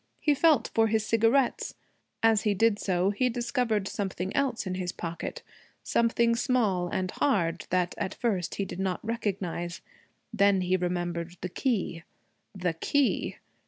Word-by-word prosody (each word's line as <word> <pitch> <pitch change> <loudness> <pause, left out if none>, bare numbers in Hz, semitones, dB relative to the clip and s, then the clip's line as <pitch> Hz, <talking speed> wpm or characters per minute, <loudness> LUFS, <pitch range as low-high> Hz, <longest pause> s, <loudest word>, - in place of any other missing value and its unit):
He 300 - +3
felt 290 -4 +3
for 225 0 +4
his 220 0 +1
cigarettes. 230 +4 +2 0.5
As 225 -2 +5
he 210 -2 +1
did 220 +1 +3
so 185 0 +1
he 250 +5 +1
discovered 235 -3 0
something 190 -2 -3
else 270 -6 0
in 185 - -2
his 185 -1 -2
pocket, 170 -1 -5 0.4
something 235 0 +2
small 220 -8 +1
and 185 +1 -2
hard 170 - 0
that 180 -1 +1
at 190 - -2
first 200 -8 -1
he 200 - -1
did 190 - -7
not 190 +1 -2
recognize. 190 -6 -3 0.5
Then 200 -1 +4
he 180 +1 +1
remembered 175 -1 -2
the 180 - -3
key 195 -7 -1 0.5
the 180 -3 -1
key. 275 - 0
200 Hz, 150 wpm, -28 LUFS, 180-230 Hz, 0.5 s, As